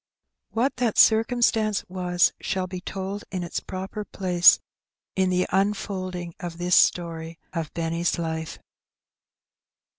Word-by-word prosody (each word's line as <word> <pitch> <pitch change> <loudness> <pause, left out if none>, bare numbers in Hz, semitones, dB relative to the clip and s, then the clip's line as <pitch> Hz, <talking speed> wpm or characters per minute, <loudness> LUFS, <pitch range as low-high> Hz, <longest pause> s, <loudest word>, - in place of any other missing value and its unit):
What 250 +5 0
that 240 -4 0
circumstance 220 -2 +3
was 180 -1 +1
shall 185 -1 -1
be 185 0 -6
told 195 +2 -5
in 185 -3 -3
its 170 - -3
proper 190 +3 -6
place 180 -3 +5 0.6
in 190 -1 +2
the 180 0 +2
unfolding 185 -3 -1
of 170 -1 -6
this 175 0 +2
story 165 -1 +1 0.2
of 165 -3 -3
Benny's 165 +1 -1
life. 160 -1 -4
185 Hz, 120 wpm, -25 LUFS, 170-200 Hz, 0.6 s, place